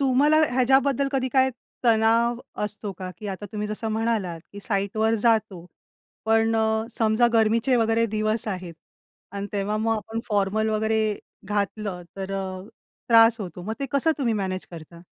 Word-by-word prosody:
तुम्हाला 280 +3 +4
ह्याच्याबद्दल 265 +2 +3
कधी 260 -1 0
काय 265 -1 +4 0.3
तणाव 230 +1 +3 0.3
असतो 210 -1 -4
का, 185 -1 -5
की 215 - -7
आता 195 +2 -5
तुम्ही 210 -1 -3
जसं 215 +1 -3
म्हणालात, 220 -7 -1
की 205 - -9
साइटवर 215 +2 0
जातो. 215 -6 +1 0.6
पण 225 0 +2
अ, 220 0 +1
समजा 220 +1 +3
गरमीचे 230 +3 +3
वगैरे 225 0 +2
दिवस 215 +1 -1
आहेत 180 -4 -5 0.6
आणि 200 0 -4
तेव्हा 205 +1 -1
मग 225 +1 +1
आपण 225 +1 -5
फॉर्मल 210 +1 +1
वगैरे 215 0 0 0.3
घातलं, 205 -2 -2
तर 195 0 -5
अ, 190 -1 -4 0.5
त्रास 230 0 +6
होतो. 180 -2 -7
मग 215 +5 -4
ते 275 - -1
कसं 280 +4 +3
तुम्ही 240 -5 +1
मॅनेज 190 -2 -3
करता? 170 0 -11
220 Hz, 155 wpm, -24 LUFS, 200-230 Hz, 0.6 s, त्रास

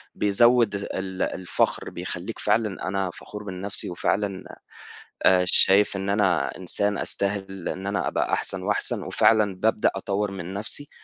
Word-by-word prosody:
بيزوّد 115 +1 +3
ال 95 -1 -5
الفخر 90 -1 -1
بيخلّيك - - -6
فعلًا 105 -4 0
أنا 95 -1 -1
فخور 105 0 -9
بنفْسي، 100 0 -3
وفعلًا 95 +2 -1 0.8
آآ 90 -1 +5
شايف 100 +3 +5
إن 95 0 -3
أنا 100 -3 +1
إنسان 100 +2 -1
أستاهل 95 -2 -3
إن 95 +2 -5
أنا 100 +1 -1
أبقى - - -1
أحسن - - -1
وأحسن، - - 0
وفعلًا 105 -3 +3
بابدأ 110 +3 +2
أطوّر 100 +1 -2
من 95 -1 -6
نفْسي، 110 +8 -1
100 Hz, 135 wpm, -25 LUFS, 95-105 Hz, 0.8 s, آآ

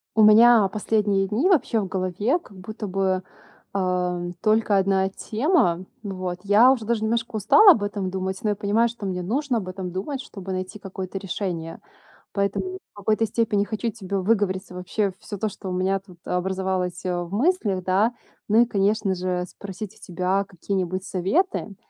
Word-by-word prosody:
У 220 - +5
меня 220 0 +7
последние 205 -1 +1
дни 225 - +1
вообще 315 - +3
в 200 - -2
голове 185 - 0
как 200 - -17
будто 215 +3 -7
бы, 190 -1 0 0.5
э, 180 -2 -1
только 215 -1 +3
1 190 0 +2
тема. 215 - +1 0.2
Ну, 200 -2 -5
вот 185 -1 -4
я 210 +6 +6
уже 240 -5 -1
даже 225 -1 0
немножко 230 +1 -1
устала 390 - +7
об 215 - +2
этом 200 -2 -2
думать, 190 0 -3
но 215 - +1
я 205 - +1
понимаю, 210 +4 +2
что 230 -3 -8
мне 185 -2 -2
нужно 250 +7 -1
об 195 -4 -4
этом 185 -1 -5
думать, 255 +10 -4
чтобы 195 -6 -7
найти 185 +3 -5
какое-то 190 -1 -6
решение. 175 -4 -4 0.5
Поэтому 200 - -1 0.2
в - - -24
какой-то 215 +2 +1
степени 215 -2 +1
хочу 220 +2 -2
тебе 200 -2 -4
выговориться 190 -2 0
вообще 190 +2 -1
всё 205 - -7
то, 215 +3 -1
что 195 - -8
у - - -3
меня 190 +2 +1
тут 185 -2 -17
образовалось, 185 0 -2
э, 180 -1 0
в 175 - -10
мыслях, 215 - +1
да. 200 +6 +2 0.4
Ну 220 +3 +6
и - - +5
конечно 200 -2 +1
же 180 0 -2
спросить 200 +2 -8
у - - -21
тебя 185 +3 0
какие-нибудь 185 0 -3
советы. 210 - 0
195 Hz, 180 wpm, -24 LUFS, 185-220 Hz, 0.5 s, меня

